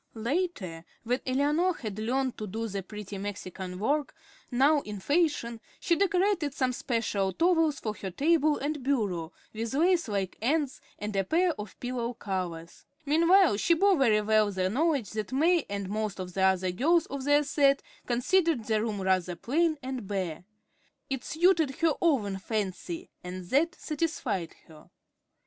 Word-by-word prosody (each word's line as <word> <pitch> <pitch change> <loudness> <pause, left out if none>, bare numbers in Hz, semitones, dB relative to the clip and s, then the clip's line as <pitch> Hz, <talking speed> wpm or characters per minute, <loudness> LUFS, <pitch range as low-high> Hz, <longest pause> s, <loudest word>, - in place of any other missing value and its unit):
Later, 225 - -2 0.2
when 245 +2 0
Eleanor 295 +7 +2
had 215 -3 -6
learned 255 +3 0
to 215 - -4
do 225 +4 -3
the 200 -2 -4
pretty 205 0 -8
Mexican 190 -2 -6
work, 285 +8 0 0.3
now 280 +4 +4
in 210 -6 -7
fashion, 285 - 0 0.2
she 345 -4 +2
decorated 370 -5 +1
some 255 -3 +1
special 220 -6 -1
towels 325 - +2
for 215 - -3
her 195 -2 -6
table 300 - +2
and 295 +1 -3
bureau, 205 -11 -1 0.2
with 225 +3 -3
lace 345 0 +3
like 195 -3 -3
ends, 290 +3 0 0.2
and 210 0 -5
a 195 - +2
pair 345 - +2
of 210 -8 -8
pillow 245 -1 -3
covers. 175 -5 -5 0.2
Meanwhile, 335 - +5
she 335 +10 +3
bore 395 +3 +4
very 230 -8 +3
well 215 -1 +3
the 185 -1 -1
knowledge 285 -2 +1
that 215 0 -4
May 330 +5 +3
and 200 -1 -3
most 210 0 -3
of 180 -1 -6
the 190 - -2
other 190 -1 +3
girls 320 - +3
of 275 -1 -6
their 290 +1 +4
set 280 -1 +3 0.2
considered 255 - +1
her 215 -1 +2
room 215 -3 -2
rather 185 -2 +1
"plain 315 - +1
and 255 -5 -5
bare." 185 -4 -3 0.7
It 270 -2 -2
suited 320 -4 +2
her 330 -2 +2
own 215 - +1
fancy, 220 - -4
and 180 0 -6
that 330 +6 +2
satisfied 290 - -3
her. 155 -2 -16
245 Hz, 160 wpm, -28 LUFS, 200-310 Hz, 0.7 s, Meanwhile